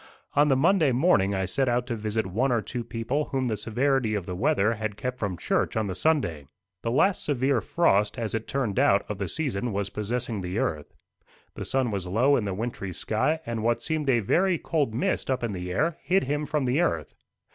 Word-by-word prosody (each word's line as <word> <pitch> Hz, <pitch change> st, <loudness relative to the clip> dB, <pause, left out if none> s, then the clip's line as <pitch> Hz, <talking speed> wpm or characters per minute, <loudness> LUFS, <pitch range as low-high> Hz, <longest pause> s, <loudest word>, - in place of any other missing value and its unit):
On 145 Hz, +1 st, +5 dB
the 135 Hz, -, +4 dB
Monday 160 Hz, +1 st, +3 dB
morning 120 Hz, -, +3 dB
I 95 Hz, 0 st, 0 dB
set 130 Hz, +8 st, +1 dB
out 120 Hz, 0 st, +1 dB
to 120 Hz, -2 st, -3 dB
visit 110 Hz, 0 st, -2 dB
one 115 Hz, +9 st, 0 dB
or 115 Hz, -3 st, +1 dB
two 120 Hz, +4 st, -4 dB
people 120 Hz, +6 st, -2 dB
whom 130 Hz, -2 st, -1 dB
the 110 Hz, -, 0 dB
severity 120 Hz, +2 st, 0 dB
of 100 Hz, -4 st, -3 dB
the 90 Hz, -, -5 dB
weather 115 Hz, -1 st, +2 dB
had 110 Hz, -2 st, -4 dB
kept 125 Hz, +3 st, -4 dB
from 100 Hz, -4 st, -2 dB
church -, -, 0 dB
on 110 Hz, -, +1 dB
the 95 Hz, -, -3 dB
Sunday. 90 Hz, -, 0 dB, 0.3 s
The 115 Hz, -, -2 dB
last 170 Hz, +10 st, +2 dB
severe 135 Hz, -3 st, +1 dB
frost, 105 Hz, -, +2 dB
as 115 Hz, -3 st, -2 dB
it 110 Hz, 0 st, -3 dB
turned 130 Hz, -8 st, -1 dB
out, 100 Hz, 0 st, +4 dB
of 105 Hz, -2 st, -5 dB
the 100 Hz, -, -2 dB
season, 125 Hz, -7 st, -2 dB
was 100 Hz, 0 st, -2 dB
possessing 115 Hz, 0 st, -3 dB
the 90 Hz, +2 st, -4 dB
earth. 75 Hz, -8 st, -2 dB, 0.6 s
The -, -, -6 dB
sun 130 Hz, -3 st, 0 dB
was 95 Hz, -3 st, -3 dB
low 125 Hz, +10 st, +3 dB
in 115 Hz, -, 0 dB
the 95 Hz, -2 st, -2 dB
wintry 100 Hz, -4 st, -4 dB
sky, 150 Hz, -, 0 dB
and 115 Hz, -3 st, -3 dB
what 115 Hz, +1 st, 0 dB
seemed 155 Hz, -3 st, -1 dB
a 120 Hz, -3 st, +4 dB
very 180 Hz, -, +2 dB
cold 145 Hz, -9 st, -1 dB
mist 125 Hz, -, -1 dB
up 130 Hz, -2 st, 0 dB
in 115 Hz, -3 st, -1 dB
the 90 Hz, -1 st, -5 dB
air 160 Hz, -, 0 dB
hid 190 Hz, +2 st, +2 dB
him 145 Hz, +2 st, -2 dB
from 150 Hz, -2 st, 0 dB
the 130 Hz, +6 st, +2 dB
earth. 85 Hz, -, -1 dB
120 Hz, 220 wpm, -26 LUFS, 100-140 Hz, 0.6 s, On